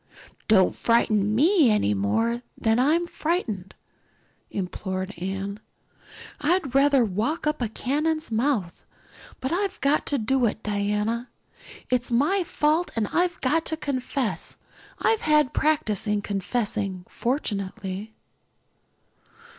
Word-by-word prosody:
"Don't 190 Hz, -4 st, +4 dB
frighten 215 Hz, -3 st, +2 dB
me 315 Hz, -, +5 dB
any 210 Hz, -, +2 dB
more 225 Hz, -, 0 dB, 0.2 s
than 225 Hz, +1 st, +2 dB
I 285 Hz, +5 st, +4 dB
am 345 Hz, +1 st, 0 dB
frightened," 300 Hz, -, -3 dB, 0.7 s
implored 190 Hz, 0 st, -4 dB
Anne. 195 Hz, +2 st, -4 dB, 0.8 s
"I'd 315 Hz, -4 st, +1 dB
rather 275 Hz, -2 st, +5 dB
walk 225 Hz, -, -1 dB
up 300 Hz, 0 st, 0 dB
to 245 Hz, -, 0 dB
a -, -, -4 dB
cannon's 305 Hz, +6 st, -1 dB
mouth. 220 Hz, -7 st, 0 dB, 0.6 s
But 260 Hz, -, -3 dB
I've 385 Hz, +2 st, -1 dB
got 280 Hz, +2 st, +2 dB
to 285 Hz, -, +1 dB
do 245 Hz, +2 st, +2 dB
it, 220 Hz, +1 st, -4 dB
Diana. 210 Hz, +3 st, -1 dB, 0.6 s
It 250 Hz, -, +4 dB
was 245 Hz, -, -7 dB
my 300 Hz, +11 st, +2 dB
fault 315 Hz, +1 st, +1 dB
and 220 Hz, -3 st, 0 dB
I've 350 Hz, 0 st, +1 dB
got 310 Hz, +5 st, +2 dB
to 320 Hz, -, -1 dB
confess. 265 Hz, -4 st, -3 dB, 0.4 s
I've 445 Hz, -1 st, +2 dB
had 300 Hz, -3 st, +3 dB
practice 225 Hz, -9 st, +1 dB
in 210 Hz, -1 st, 0 dB
confessing, 200 Hz, -2 st, -2 dB
fortunately." 205 Hz, -4 st, -3 dB
235 Hz, 125 wpm, -25 LUFS, 205-300 Hz, 0.8 s, me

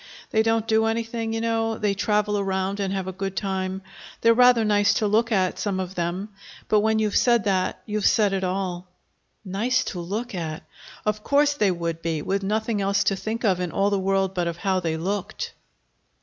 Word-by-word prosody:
They 220 Hz, -, +3 dB
don't 225 Hz, 0 st, +1 dB
do 220 Hz, -1 st, +3 dB
anything, 225 Hz, 0 st, -2 dB
you 225 Hz, 0 st, -2 dB
know 225 Hz, -1 st, 0 dB
they 210 Hz, -2 st, +1 dB
travel 210 Hz, +1 st, +1 dB
around 195 Hz, 0 st, -1 dB
and 195 Hz, -1 st, -1 dB
have 190 Hz, -1 st, -2 dB
a -, -, -2 dB
good 195 Hz, +1 st, -5 dB
time. 190 Hz, -1 st, -2 dB, 0.4 s
They're 230 Hz, 0 st, +6 dB
rather 245 Hz, -1 st, +5 dB
nice 205 Hz, -1 st, +3 dB
to 215 Hz, -, +1 dB
look 225 Hz, +3 st, +2 dB
at, 185 Hz, -4 st, +1 dB
some 195 Hz, -3 st, -1 dB
of 185 Hz, 0 st, -4 dB
them. 180 Hz, +3 st, -3 dB, 0.4 s
But 215 Hz, -, +4 dB
when 220 Hz, +1 st, +2 dB
you've 215 Hz, -1 st, 0 dB
said 235 Hz, -3 st, +4 dB
that 185 Hz, -2 st, 0 dB
you've 210 Hz, -1 st, 0 dB
said 205 Hz, -3 st, +3 dB
it 190 Hz, -1 st, -1 dB
all." 185 Hz, -1 st, -3 dB, 0.6 s
Nice 225 Hz, +7 st, 0 dB
to 180 Hz, -, -5 dB
look 210 Hz, +8 st, -4 dB
at! 160 Hz, -4 st, -4 dB, 0.4 s
Of 210 Hz, 0 st, -1 dB
course 290 Hz, +1 st, +3 dB
they 210 Hz, -8 st, +2 dB
would 170 Hz, -2 st, -3 dB
be, 160 Hz, -3 st, -2 dB
with 195 Hz, +1 st, -1 dB
nothing 215 Hz, +1 st, -1 dB
else 200 Hz, 0 st, +2 dB
to 195 Hz, -, +1 dB
think 225 Hz, +4 st, -3 dB
of 190 Hz, -4 st, +2 dB
in 180 Hz, -2 st, -2 dB
all 200 Hz, +1 st, +1 dB
the 200 Hz, -, +1 dB
world 195 Hz, 0 st, +1 dB
but 175 Hz, -2 st, -1 dB
of 170 Hz, 0 st, -3 dB
how 190 Hz, 0 st, 0 dB
they 165 Hz, -3 st, -2 dB
looked. 190 Hz, +4 st, -3 dB
200 Hz, 205 wpm, -24 LUFS, 185-220 Hz, 0.6 s, They're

